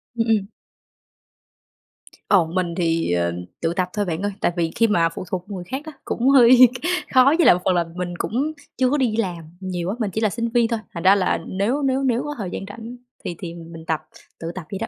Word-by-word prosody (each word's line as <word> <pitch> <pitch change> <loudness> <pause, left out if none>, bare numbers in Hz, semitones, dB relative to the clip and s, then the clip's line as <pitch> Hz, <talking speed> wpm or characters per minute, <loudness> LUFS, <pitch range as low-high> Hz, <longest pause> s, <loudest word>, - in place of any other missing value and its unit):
Ừm, 230 0 0
ừm. 215 -3 +1 1.8
Ồ, 190 -5 +5
mình 170 +1 -2
thì, 165 - 0
ờ, 85 -1 +1 0.3
tự 165 0 0
tập 180 0 -1
thôi 205 -1 0
bạn 170 +1 -3
ơi, 205 - -1
tại - - +2
vì 165 -1 0
khi 230 - +4
mà 170 -5 +3
phụ 165 - -7
thuộc 180 -1 -3
người 190 -3 -5
khác 260 +10 -5
á 315 - -7
cũng 245 +3 +1
hơi 255 -1 +8 0.5
khó 260 +2 +6
với 340 - +4
lại - - +8
một 180 - -5
phần 185 - +3
là 170 -1 +2
mình 180 -1 -3
cũng 280 - -1 0.2
chưa 255 -1 +3
có 290 - +1
đi 245 -6 +1
làm 180 -7 -2 0.2
nhiều 185 -2 -3
á, 200 - -2
mình 210 -4 -1
chỉ 220 - -2
là 215 - +3
sinh 230 +4 -2
viên 235 0 +3
thôi, 230 -1 -1
thành 170 - -5
ra 190 +2 +7
là 185 -2 +1
nếu 210 +10 0
nếu 270 -1 +1
nếu 250 -1 +1
có 295 0 -5
thời 200 -5 -4
gian 195 - -5
rảnh 230 +3 -9 0.3
thì 175 - -4
thì 175 -4 -6
mình 165 -1 -10
tập 160 -1 0 0.4
tự 165 0 -4
tập 185 -4 -6
vậy 195 - -4
đó. - - -3
195 Hz, 240 wpm, -22 LUFS, 175-235 Hz, 1.8 s, hơi